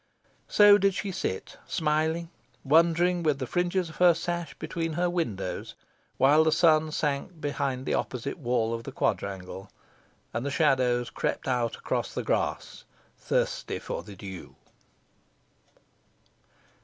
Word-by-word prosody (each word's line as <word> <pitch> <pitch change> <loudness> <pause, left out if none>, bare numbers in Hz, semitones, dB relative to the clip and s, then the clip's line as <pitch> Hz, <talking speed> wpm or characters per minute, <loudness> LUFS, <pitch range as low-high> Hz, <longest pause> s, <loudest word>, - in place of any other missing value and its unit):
So 205 0 +7
did 195 -1 +2
she 200 - -3
sit, 95 - -4
smiling, 160 +2 0 0.3
wondering, 170 +4 +3
with 155 -4 +1
the 130 - -3
fringes 175 +5 0
of 160 - -12
her 175 -2 +6
sash 170 -2 -4
between 165 -1 -3
her 175 +2 0
fingers, 105 - -3 0.4
while 145 +4 +5
the 160 - +2
sun 155 -1 +4
sank 150 +3 -2
behind 135 -3 -2
the - - -1
opposite 135 +6 -3
wall 120 -4 0
of 115 - -3
the - - -7
quadrangle, 95 0 -3 0.6
and 120 - -2
the 140 - -2
shadows 130 -5 +2
crept - - -2
out 120 -3 0
across - - -3
the - - -2
grass, - - -2 0.3
thirsty - - -1
for - - -5
the 105 -2 -11
dew. 95 -1 -9
150 Hz, 135 wpm, -27 LUFS, 125-170 Hz, 0.6 s, So